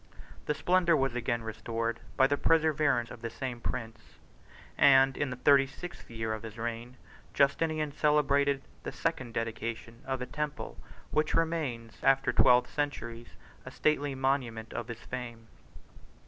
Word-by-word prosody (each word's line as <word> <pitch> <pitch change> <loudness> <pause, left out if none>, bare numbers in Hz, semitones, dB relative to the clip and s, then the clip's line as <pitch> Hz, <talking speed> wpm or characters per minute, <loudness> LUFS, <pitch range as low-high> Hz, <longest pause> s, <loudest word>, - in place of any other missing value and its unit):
Its 150 - 0
splendor 175 -2 +3
was 135 -2 +1
again 120 -1 -1
restored 115 +1 -3 0.2
by 130 - +6
the 145 +2 +2
perseverance 155 -6 +2
of 115 - -10
the 115 - -3
same 120 +1 -5
prince; 115 -2 -6 0.6
and 135 -1 +6
in 145 - -1
the 125 - -4
thirty 135 +2 +5
sixth 175 +6 -10
year 115 -1 -3
of 110 - -5
his 110 0 -9
reign, 120 +2 -5 0.4
Justinian 155 +2 +2
celebrated 140 -2 +2 0.2
the - - -5
second 130 -7 -2
dedication 115 +1 -4
of 130 -1 -1
a 125 - -3
temple 150 +2 -4 0.4
which 155 0 +1
remains, 145 -9 -1
after 135 0 +3
twelve 125 0 +5
centuries, 120 -5 -4 0.3
a - - -8
stately 145 -2 0
monument 130 -4 -1
of - - -4
his 115 -1 -7
fame. 120 -2 -7
130 Hz, 150 wpm, -30 LUFS, 115-145 Hz, 0.6 s, by